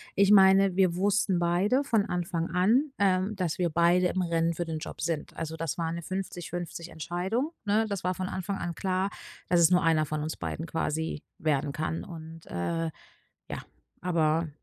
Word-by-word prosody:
ich 200 Hz, +1 st, +5 dB
meine, 195 Hz, -1 st, +6 dB
wir 185 Hz, -3 st, +4 dB
wussten 195 Hz, -1 st, +2 dB
beide 185 Hz, +10 st, +2 dB
von 225 Hz, -6 st, +2 dB
Anfang 175 Hz, -3 st, -2 dB
an, 230 Hz, +11 st, +3 dB
ähm, 195 Hz, +1 st, +2 dB
dass 180 Hz, -5 st, -2 dB
wir 175 Hz, -2 st, +1 dB
beide 170 Hz, +2 st, +4 dB
im 185 Hz, -, -1 dB
Rennen 170 Hz, -1 st, +1 dB
für 175 Hz, -, -2 dB
den 160 Hz, -2 st, -4 dB
Job 170 Hz, -, -7 dB
sind. 165 Hz, -3 st, -2 dB
Also, 160 Hz, 0 st, -4 dB
das 165 Hz, -2 st, -3 dB
war 165 Hz, -1 st, -1 dB
'ne 170 Hz, 0 st, -4 dB
50:50 175 Hz, -1 st, -5 dB
Entscheidung, 185 Hz, -, -2 dB
ne? 215 Hz, +2 st, +3 dB
Das 200 Hz, -4 st, -3 dB
war 185 Hz, -, +2 dB
von 185 Hz, 0 st, -3 dB
Anfang 190 Hz, +1 st, -3 dB
an 170 Hz, -, -3 dB
klar, 190 Hz, +2 st, -1 dB, 0.4 s
dass 175 Hz, -1 st, +4 dB
es 165 Hz, 0 st, +6 dB
nur 180 Hz, 0 st, +4 dB
einer 160 Hz, -2 st, +3 dB
von 150 Hz, 0 st, -3 dB
uns 155 Hz, -, -4 dB
beiden 165 Hz, -, -4 dB
quasi 160 Hz, -1 st, -2 dB, 0.2 s
werden 150 Hz, -4 st, 0 dB
kann. 155 Hz, +1 st, -3 dB
Und, 165 Hz, -1 st, -10 dB
äh, 165 Hz, -, -2 dB, 0.6 s
ja, -, -, -5 dB, 0.4 s
aber 165 Hz, -2 st, +1 dB
175 Hz, 185 wpm, -28 LUFS, 165-190 Hz, 0.6 s, meine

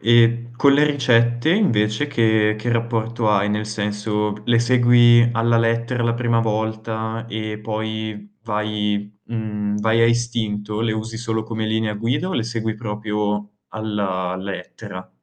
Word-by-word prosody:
E 120 Hz, +1 st, +4 dB
con 140 Hz, +1 st, +5 dB
le 145 Hz, +2 st, +5 dB
ricette, 120 Hz, -2 st, +2 dB
invece 115 Hz, -, +1 dB
che 110 Hz, -5 st, +2 dB
che 120 Hz, +2 st, -1 dB
rapporto 115 Hz, -1 st, 0 dB
hai? 100 Hz, 0 st, +2 dB
Nel 105 Hz, +1 st, -1 dB
senso: 105 Hz, 0 st, -2 dB
le 120 Hz, -1 st, +4 dB
segui 120 Hz, -1 st, +5 dB
alla 115 Hz, 0 st, +2 dB
lettera 115 Hz, +2 st, 0 dB
la 115 Hz, 0 st, +1 dB
prima 115 Hz, -1 st, +1 dB
volta 110 Hz, +1 st, -2 dB
e 110 Hz, -1 st, -4 dB
poi 110 Hz, -1 st, -5 dB
vai 105 Hz, -1 st, -2 dB
mhmm, 105 Hz, -2 st, -3 dB
vai 110 Hz, +2 st, +2 dB
a 115 Hz, -, +6 dB
istinto? 110 Hz, -3 st, -1 dB
Le 115 Hz, -1 st, 0 dB
usi 110 Hz, +1 st, -4 dB
solo 110 Hz, -2 st, -2 dB
come 110 Hz, -1 st, -3 dB
linea 110 Hz, -1 st, -1 dB
guida 125 Hz, -, -1 dB
o 190 Hz, -, -3 dB
le 115 Hz, -, 0 dB
segui 110 Hz, -1 st, -3 dB
proprio 105 Hz, -1 st, -3 dB, 0.2 s
alla 100 Hz, -4 st, -2 dB
lettera? 95 Hz, 0 st, -7 dB
110 Hz, 145 wpm, -21 LUFS, 105-115 Hz, 0.2 s, a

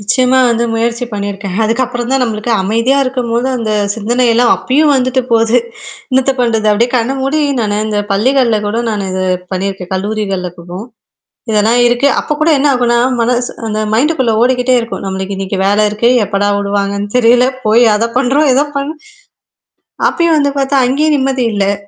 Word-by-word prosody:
நிச்சயமா 255 Hz, +5 st, +1 dB
வந்து 235 Hz, 0 st, 0 dB
முயற்சி 235 Hz, +2 st, -1 dB
பண்ணியிருக்கேன். 200 Hz, -2 st, -4 dB
அதுக்கப்புறம் 240 Hz, +2 st, -2 dB
தான் 270 Hz, -1 st, +2 dB
நம்மளுக்கு 225 Hz, -1 st, -2 dB
அமைதியா 230 Hz, +7 st, +1 dB
இருக்கும்போது 250 Hz, -1 st, -2 dB
அந்த 225 Hz, -2 st, -3 dB, 0.2 s
சிந்தனைல்லாம் 235 Hz, +2 st, +1 dB
அப்பயும் 290 Hz, +3 st, +2 dB
வந்துட்டு 255 Hz, 0 st, 0 dB
போகுது. 230 Hz, +1 st, +3 dB, 0.5 s
என்னத்த 265 Hz, +1 st, +2 dB
பண்றது? 225 Hz, -3 st, 0 dB
அப்படியே 235 Hz, +4 st, +1 dB
கண்ண 235 Hz, +2 st, 0 dB
மூடி 275 Hz, +4 st, 0 dB, 0.2 s
நானு 210 Hz, -1 st, -1 dB
இந்த 210 Hz, -1 st, -1 dB
பள்ளிகள்ல 235 Hz, +1 st, +2 dB
கூட 215 Hz, +3 st, -2 dB
நானு 205 Hz, -3 st, -3 dB
இது 185 Hz, 0 st, -2 dB, 0.3 s
பண்ணியிருக்கேன் 190 Hz, -1 st, -4 dB
கல்லூரிகள்ல 195 Hz, -2 st, -3 dB
கூட. 170 Hz, +1 st, -13 dB, 0.8 s
இதெல்லாம் 220 Hz, +3 st, +2 dB
இருக்கு. 245 Hz, +4 st, +2 dB
அப்போ -, -, -4 dB
கூட 310 Hz, -, +1 dB
என்ன 290 Hz, -, +1 dB
ஆகும்னா, 240 Hz, -1 st, +1 dB, 0.2 s
மனசு 245 Hz, +1 st, 0 dB, 0.2 s
அந்த 215 Hz, 0 st, -2 dB
மைண்டுக்குள்ள 260 Hz, 0 st, +1 dB
ஓடிக்கிட்டே 250 Hz, 0 st, +2 dB
இருக்கும். 230 Hz, -3 st, -5 dB
நம்மளுக்கு 190 Hz, 0 st, -4 dB
இன்னைக்கு 195 Hz, 0 st, -4 dB
வேல 205 Hz, +1 st, +2 dB
இருக்கு 215 Hz, +3 st, 0 dB, 0.2 s
எப்படா 200 Hz, 0 st, -1 dB
விடுவாங்கன்னு 200 Hz, 0 st, -2 dB
தெரியல. 245 Hz, +1 st, +4 dB, 0.2 s
போய் 230 Hz, +3 st, +4 dB
அத 225 Hz, +2 st, 0 dB
பண்றோம், 275 Hz, +4 st, +2 dB
ஏதோ 280 Hz, +3 st, +2 dB
பண்ண 280 Hz, +3 st, -3 dB, 1.2 s
அப்பயும் 335 Hz, -1 st, +1 dB
வந்து 285 Hz, -1 st, +1 dB
பார்த்தா, 270 Hz, -1 st, +1 dB
அங்கேயும் 300 Hz, +4 st, +1 dB
நிம்மதி 265 Hz, -2 st, 0 dB
இல்ல. 200 Hz, 0 st, +1 dB
235 Hz, 155 wpm, -13 LUFS, 205-255 Hz, 1.2 s, தெரியல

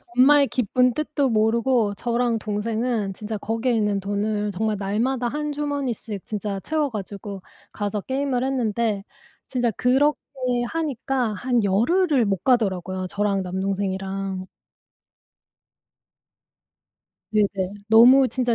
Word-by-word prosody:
엄마의 280 Hz, +2 st, +6 dB
깊은 250 Hz, +1 st, +1 dB
뜻도 295 Hz, -2 st, 0 dB
모르고 225 Hz, 0 st, +2 dB
저랑 235 Hz, 0 st, 0 dB
동생은 215 Hz, 0 st, -2 dB
진짜 215 Hz, +2 st, -5 dB
거기에 225 Hz, +4 st, -1 dB
있는 210 Hz, -3 st, +1 dB
돈을 205 Hz, +1 st, -1 dB
정말 215 Hz, +2 st, -1 dB
날마다 235 Hz, +6 st, 0 dB
한 300 Hz, +3 st, -3 dB
주머니씩 275 Hz, -8 st, -3 dB
진짜 205 Hz, -2 st, -3 dB
채워 310 Hz, +2 st, 0 dB
가지고 200 Hz, -2 st, -6 dB, 0.3 s
가서 205 Hz, -1 st, -3 dB
게임을 265 Hz, 0 st, -1 dB
했는데 230 Hz, -5 st, 0 dB, 0.4 s
진짜 245 Hz, -2 st, 0 dB
그렇게 270 Hz, +7 st, +2 dB, 0.5 s
하니까 270 Hz, -7 st, -1 dB
한 240 Hz, +2 st, 0 dB
열흘을 265 Hz, -, +2 dB
못 195 Hz, -3 st, -1 dB
가더라고요, 185 Hz, -6 st, +1 dB
저랑 200 Hz, -1 st, 0 dB
남동생이랑. 190 Hz, 0 st, -3 dB, 2.8 s
네네. 200 Hz, -2 st, 0 dB
너무 250 Hz, +4 st, +7 dB
진짜 245 Hz, -3 st, 0 dB
225 Hz, 260 characters per minute, -23 LUFS, 200-255 Hz, 2.8 s, 너무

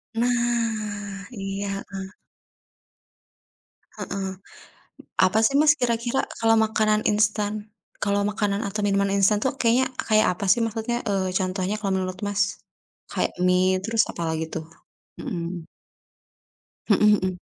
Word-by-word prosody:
Nah 225 Hz, -4 st, -1 dB
iya, 195 Hz, -2 st, -4 dB, 0.2 s
heeh. 195 Hz, 0 st, -7 dB, 1.8 s
Heeh. 195 Hz, -1 st, -4 dB, 1.0 s
Apa 200 Hz, +4 st, +2 dB
sih, 275 Hz, -, +2 dB
Mas, 300 Hz, -1 st, +6 dB
kira-kira 240 Hz, +1 st, 0 dB, 0.2 s
kalau 225 Hz, 0 st, +4 dB
makanan 215 Hz, -1 st, +2 dB
instan, 210 Hz, 0 st, +1 dB, 0.5 s
kalau 200 Hz, -1 st, +1 dB
makanan 205 Hz, -1 st, -1 dB
atau 210 Hz, +1 st, -3 dB
minuman 200 Hz, 0 st, +2 dB
instan 200 Hz, +2 st, +4 dB
tuh 265 Hz, -, +2 dB
kayaknya 240 Hz, +2 st, +3 dB, 0.2 s
kayak 215 Hz, -1 st, +4 dB
apa 200 Hz, -, -4 dB
sih 235 Hz, -, +4 dB
maksudnya, 225 Hz, +2 st, -2 dB
eee, 190 Hz, -2 st, 0 dB
contohnya 185 Hz, +2 st, -1 dB
kalau 195 Hz, -2 st, -1 dB
menurut, 185 Hz, -1 st, -3 dB
Mas? 205 Hz, 0 st, 0 dB, 0.7 s
Kayak -, -, 0 dB
mie, 185 Hz, +1 st, +3 dB
terus 225 Hz, +1 st, +2 dB
apalagi 160 Hz, -1 st, -2 dB
tuh? 160 Hz, -1 st, -4 dB, 0.5 s
Mhm. 170 Hz, -1 st, -4 dB, 1.2 s
Mhm, 205 Hz, -, +3 dB, 0.2 s
mhm. 185 Hz, -1 st, -2 dB
205 Hz, 120 wpm, -24 LUFS, 190-225 Hz, 1.8 s, Mas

